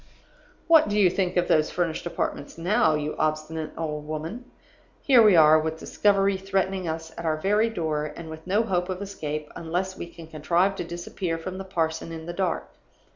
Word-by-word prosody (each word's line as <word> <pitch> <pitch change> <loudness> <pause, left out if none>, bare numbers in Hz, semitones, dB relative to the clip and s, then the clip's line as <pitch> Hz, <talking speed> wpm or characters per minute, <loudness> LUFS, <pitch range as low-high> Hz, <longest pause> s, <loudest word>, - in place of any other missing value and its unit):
"What 320 -9 +6
do 205 - 0
you 185 -4 +5
think 185 -1 -1
of 175 - +2
those 155 -1 +3
furnished 175 -1 -2
apartments 155 -3 -4
now, 170 -1 +2
you 150 0 -3
obstinate 155 0 -1
old 150 -2 -4
woman? 160 +11 -5 0.6
Here 260 -4 +6
we 210 -4 +6
are, 155 -1 +7
with 160 +1 -3
discovery 195 +2 +2
threatening 190 -1 -1
us 160 0 -4
at 170 - -5
our 155 -1 +1
very 210 +7 +2
door, 155 -7 -2
and 170 - -8
with 160 +1 -9
no 205 +4 +2
hope 180 -4 -1
of 185 -1 -3
escape 155 -7 -5
unless 180 +3 -3
we - - -6
can 170 -1 -12
contrive 170 +5 +1
to - - -2
disappear 170 0 -4
from 185 +3 -6
the 195 - -6
parson 165 -3 -2
in 160 -1 -7
the 175 - -5
dark. 185 -1 -2
170 Hz, 190 wpm, -25 LUFS, 160-190 Hz, 0.6 s, are